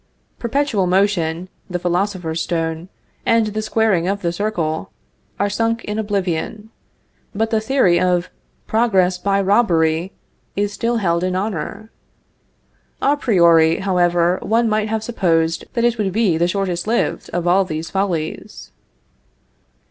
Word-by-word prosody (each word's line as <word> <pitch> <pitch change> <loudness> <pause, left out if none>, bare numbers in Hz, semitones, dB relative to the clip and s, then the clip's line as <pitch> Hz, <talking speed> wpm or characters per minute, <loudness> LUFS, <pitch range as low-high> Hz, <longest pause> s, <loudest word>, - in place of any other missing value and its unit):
_ - - -42
Perpetual 235 -5 0
motion, 180 -3 +1 0.2
the 180 - -2
philosopher's 180 -2 -1
stone, 165 +1 -2 0.3
and 230 -1 +3
the 215 0 -3
squaring 215 -5 +1
of 200 +1 -2
the 170 - +1
circle, 170 - -2 0.5
are 200 - +2
sunk 225 +3 -1
in 210 +1 -3
oblivion; 205 +1 -3 0.6
but 225 +2 0
the 220 -1 +2
theory 220 -8 +3
of 180 -1 +1 0.3
progress 190 -6 +2
by 200 +1 +1
robbery 180 -4 +2 0.4
is 205 +1 -1
still 235 +2 -1
held 170 -5 0
in 185 0 -1
honor. 200 +2 -4 1.1
A 285 +2 +2
priori, 170 - +4
however, 175 -2 +2
one 230 +2 +1
might 215 0 0
have 220 0 -2
supposed 165 -8 0
that 235 - 0
it 240 -1 +1
would 195 -3 0
be 205 -4 +2
the 170 +2 +2
shortest 180 -1 -2
lived 235 +2 -1
of 175 -1 -2
all 185 +3 +4
these 160 -2 -5
follies. 180 -5 -3
190 Hz, 140 wpm, -19 LUFS, 170-215 Hz, 1.1 s, priori